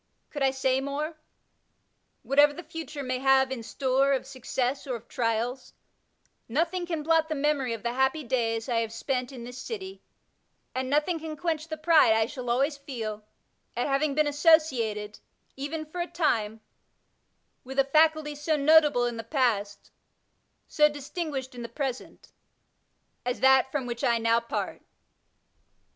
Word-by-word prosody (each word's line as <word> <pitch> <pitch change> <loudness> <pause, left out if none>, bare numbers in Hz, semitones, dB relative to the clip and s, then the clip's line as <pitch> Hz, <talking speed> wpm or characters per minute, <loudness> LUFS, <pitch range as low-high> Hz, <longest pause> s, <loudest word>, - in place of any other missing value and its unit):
Gould 290 - -6
I 270 - +4
say 265 0 0
morel 290 +4 -3 1.1
Whatever 290 +1 +5
the 345 - -8
future 310 -2 -7
may 255 -1 -2
have 265 0 +4
in 260 -3 -3
store 270 +3 +1
of 265 - -1
success 260 +1 -3
or 255 - -2
of 230 0 -10
trials, 235 +2 -2 0.8
nothing 340 +7 0
can 325 -3 -3
blot 320 0 +2
the 310 - -1
memory 280 -3 0
of 225 - -7
the 235 0 -1
happy 265 +4 +1
days 230 -2 -1
I 235 -3 +1
have 225 -1 -2
spent 250 +2 -2
in 250 -3 -9
this 250 +1 -8
city, 390 -4 -7 0.7
and 260 0 -2
nothing 300 +4 +1
can 310 -1 -6
quench 320 -1 -2
the 315 -1 -5
pride 310 -7 +5
I 220 0 +3
shall 250 0 -6
always 275 +5 +1
feel 225 -7 -6 0.5
at 245 - +1
having 275 +1 +1
been 305 0 +3
associated, 275 -9 +2 0.4
even 300 +3 -4
for 345 +3 -5
a 345 - -2
time, 225 -11 0 1.0
with 265 +1 -9
a 275 - +6
Faculty 310 +1 +3
so 295 +2 -1
notable 295 -3 +5
in 240 -1 -3
the 225 - -5
past, 225 -6 -1 0.8
so 300 0 +4
distinguished 290 -2 -5
in 245 - -8
the 235 - -6
present, 260 0 -5 0.9
as 245 0 -2
that 265 0 +5
from 275 -3 -2
which 240 0 -5
I 235 -3 +3
now 230 0 +3
part. 235 - -4
270 Hz, 160 wpm, -27 LUFS, 245-305 Hz, 1.1 s, a